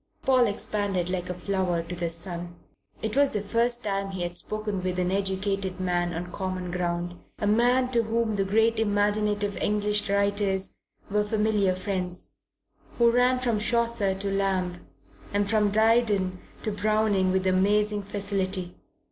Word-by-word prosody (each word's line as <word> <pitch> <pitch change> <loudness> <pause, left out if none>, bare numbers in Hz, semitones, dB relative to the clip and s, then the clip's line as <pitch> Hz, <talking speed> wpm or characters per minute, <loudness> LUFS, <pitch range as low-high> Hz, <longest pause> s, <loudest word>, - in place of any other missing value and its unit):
Paul 255 -2 +4
expanded 200 -3 -1
like 180 -1 -3
a 180 - -3
flower 180 -2 -1
to 170 +2 -6
the 170 -1 -2
sun. 170 +1 -5 0.5
It 220 +1 -2
was 280 0 +5
the 210 - 0
first 235 +4 +1
time 195 -1 -1
he 190 -2 -4
had 175 0 -4
spoken 210 0 -4
with 185 0 -2
an 180 0 0
educated 195 -1 -1
man 175 -1 0
on 175 +1 -5
common 185 -1 -4
ground 175 0 -2 0.2
a - - -2
man 245 +4 +3
to 235 -2 +3
whom 225 -1 0
the 195 - +1
great 220 +3 +2
imaginative 205 -1 +1
English 210 0 0
writers 200 -1 +1 0.3
were 210 0 +2
familiar 210 -3 +1
friends, 185 -1 -4 0.7
who 235 -1 +5
ran 250 +1 +3
from 240 -4 0
Chaucer 235 -3 +1
to 195 +1 -3
Lamb 190 -2 -1 0.5
and 205 0 +2
from 210 -1 +3
Dryden 210 -4 +2 0.2
to 215 - -1
Browning 205 -2 +2
with 190 0 0
amazing 205 +3 +2
facility. 195 -2 -3
200 Hz, 155 wpm, -26 LUFS, 185-215 Hz, 0.7 s, was